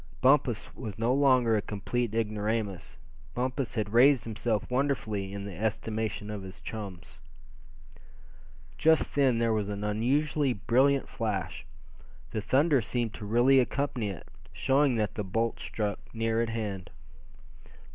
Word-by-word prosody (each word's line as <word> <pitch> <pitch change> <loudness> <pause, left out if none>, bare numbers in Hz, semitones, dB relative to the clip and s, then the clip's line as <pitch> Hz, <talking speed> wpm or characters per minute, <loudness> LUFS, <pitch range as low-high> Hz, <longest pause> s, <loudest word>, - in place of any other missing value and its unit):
Bumpus 130 -6 +2
was 105 -6 -7
no 115 +3 +1
longer 130 -5 +4
a 105 - +1
complete 110 +3 -3
ignoramus; 105 -8 -2 0.4
Bumpus 125 0 -2
had 105 -2 -2
raised 130 +1 +6
himself 110 -1 -2
wonderfully 125 -7 -1
in 100 0 -6
the 100 -3 -7
estimation 110 +1 -2
of 105 -2 -5
his 95 0 -10
chums. 90 -8 -8 1.6
Just 160 0 +3
then 135 -4 +3
there 115 -1 +2
was 105 -2 -1
an 100 0 -4
unusually 135 +6 +1
brilliant 130 +6 +2
flash. 105 -9 -3 0.6
The 110 - -2
thunder 140 +4 +3
seemed 115 0 -1
to 105 - -7
really 120 +5 +5
accompany 130 -4 -1
it, 95 - -8 0.2
showing 135 -1 +2
that 105 -2 -1
the 105 - -3
bolt 115 +4 -1
struck 105 -2 -3 0.2
near 115 0 +1
at 115 - -1
hand. 105 -5 -4
115 Hz, 135 wpm, -29 LUFS, 105-130 Hz, 1.6 s, raised